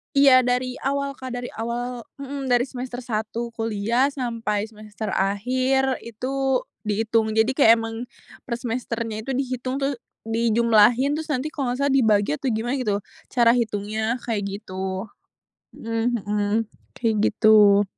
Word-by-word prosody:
Iya 270 -2 +7
dari 250 +1 0
awal, 280 0 -1
Kak, 260 -2 -7
dari 245 0 -4
awal 240 +1 -4 0.2
mhm, 275 -1 -4
dari 245 +1 +3
semester 250 -1 -6
1 230 -1 -3
kuliah 225 +4 +1
sampai 230 -6 -2
semester 215 0 -8
akhir 255 +7 +1
itu 235 +2 -6 0.6
dihitung, 220 +1 +1
jadi 220 +1 +3
kayak 230 -6 +7
emang 225 0 -4 0.5
per 235 -2 -4
semesternya 230 -2 -3
itu 270 - -4
dihitung 255 0 -2
tuh 275 0 0 0.3
dijumlahin 230 +3 +3
terus 315 0 -6
nanti 265 +2 -1
kalau 275 -5 -2
nggak 250 - -5
salah 280 -1 +2
dibagi 210 - +3
atau 265 - -4
gimana 230 +4 -1
gitu, 215 -7 0 0.3
cara 235 -2 +4
hitungnya 220 +1 -1
kayak 220 -3 0 0.2
gitu. 190 0 -4 0.7
Mhm 230 0 -1
mhm, 205 0 -1 0.4
kayak 230 -2 0
gitu. 210 -2 +6
235 Hz, 140 wpm, -23 LUFS, 215-255 Hz, 0.7 s, Iya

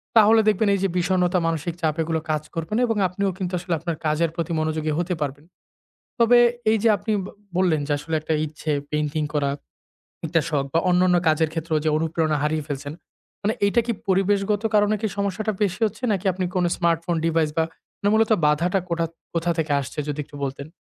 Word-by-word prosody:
তাহলে 220 0 +7
দেখবেন 215 0 +3
এই 195 - -2
যে 195 - +2
বিষণ্ণতা, 180 0 +2
মানসিক 165 0 -2
চাপ 155 -2 +1
এগুলো 160 0 -1
কাজ 155 0 -1
করবে 165 +2 -4
না 245 - +2
এবং 225 -2 0
আপনিও 195 +2 -1
কিন্তু 185 -1 -3
আসলে 175 -1 -3
আপনার 170 -1 -3
কাজের 155 +2 +2
প্রতি 170 -1 -3
মনোযোগী 155 0 -1
হতে 175 +1 -1
পারবেন। 145 +1 -4 0.7
তবে 235 +1 +6 0.3
এই 220 - +3
যে 230 - +4
আপনি 215 +3 -3
ব - - -7 0.3
বললেন 175 -5 +2
যে 150 - -1
আসলে 160 +2 -4
একটা 155 +1 -3
ইচ্ছে 155 +1 -5 0.2
পেইন্টিং 150 0 -1
করা। 140 -1 +1 0.8
একটা 165 +1 +2
শখ 145 -3 0
বা - - +5
অন্যান্য 180 0 +4
কাজের 155 0 +2
ক্ষেত্রেও 160 -1 -1
যে - - +2
অনুপ্রেরণা 160 -1 0
হারিয়ে 150 -1 -1
ফেলছেন। 145 +1 -4 0.5
মানে 215 +2 +1
এইটা 235 +4 +3
কি 235 - +1 0.2
পরিবেশগত 200 +2 +2
কারণে 210 0 +4
কি 220 - 0
সমস্যাটা 200 +2 -1
বেশি 190 +1 0
হচ্ছে 215 +4 -7
নাকি 195 0 -2
আপনি 185 +1 -3
কোন 180 - +2
স্মার্টফোন 170 0 0
ডিভাইস 165 -2 +2 0.5
না - - +4
মূলত 220 0 +3 0.2
বাধাটা 170 +6 +2
কোটা 170 -1 0 0.3
কোথা 170 +1 0
থেকে 155 -2 0
আসছে 140 +3 -8
যদি 150 0 -3
একটু 145 - -13
বলতেন। 140 +1 -5
170 Hz, 195 wpm, -23 LUFS, 155-195 Hz, 0.8 s, তাহলে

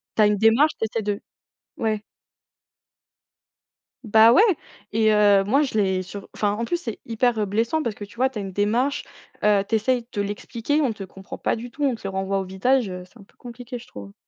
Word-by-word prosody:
tu 220 - +3
as - - +6
une 210 0 +2
démarche, 230 +9 +4
tu - - 0
essaies 220 0 -3
de 205 0 -2 0.6
ouais. 215 -2 -1 2.0
Bah, 220 +1 +7
ouais, 370 - +6 0.5
et, 220 0 +3
heu, 205 -2 +5
moi 265 +9 +2
je 280 -6 -1
l'ai 190 -2 +1
sur 195 +2 -9
enfin, 205 -1 0
en 230 - -3
plus, 345 +9 -1
c'est 235 -11 -6
hyper, 230 0 +1
heu, 210 - +1
blessant 230 +10 0
parce 220 - -2
que, 205 - -7
tu 200 - -18
vois, 260 +2 +2
tu 235 -5 -6
as - - -3
une 195 -2 -6
démarche, 230 +8 0 0.4
heu, 205 -1 +4
tu 225 - +1
essaies 240 +2 +1
de 205 - -1
l'expliquer, 230 +7 -2
on 250 -6 +1
te 200 - -8
comprend 190 +1 -10
pas - - -1
du 240 +2 -7
tout, 290 +5 -6
on 265 -3 +2
te - - -15
le - - -2
renvoie 195 +1 -1
au 190 - -3
visage, 210 +5 +1
heu, 180 0 -6
c'est 215 - -21
un - - -13
peu - - -27
compliqué, 245 +1 -8
je 240 - -13
trouve. 100 -1 -10
220 Hz, 230 wpm, -23 LUFS, 200-245 Hz, 2.0 s, Bah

